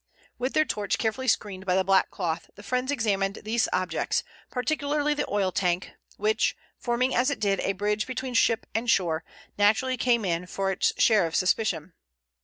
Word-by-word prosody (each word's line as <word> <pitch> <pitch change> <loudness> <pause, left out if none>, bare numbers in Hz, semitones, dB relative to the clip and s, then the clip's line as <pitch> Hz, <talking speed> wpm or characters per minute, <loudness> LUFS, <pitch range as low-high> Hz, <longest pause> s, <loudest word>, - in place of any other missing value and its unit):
With 255 +2 -1
their 310 - +3
torch 205 -7 -1
carefully 240 +4 -2
screened 195 -5 -1
by 180 - +3
the 190 - +3
black 195 0 +3
cloth 165 -3 -3
the 205 - -12
friends 250 +5 -1
examined 200 -6 0
these 220 +2 +1
objects, 180 -3 0 0.3
particularly 290 +3 0
the 295 0 -3
oil 195 -2 +1
tank 180 0 0 0.3
which, 430 +1 +1 0.2
forming 245 +2 0
as 250 +3 +3
it 285 - -2
did 200 -2 +1
a 195 - 0
bridge 210 +2 -1
between 255 0 -4
ship 230 0 +3
and 230 +2 -1
shore, 165 -6 +2 0.4
naturally 220 +6 +3
came 235 -3 +2
in 175 0 -1
for 195 +1 -1
its 190 - +1
share 215 -7 +4
of 160 - -6
suspicion. 185 -3 0
210 Hz, 180 wpm, -26 LUFS, 190-250 Hz, 0.4 s, share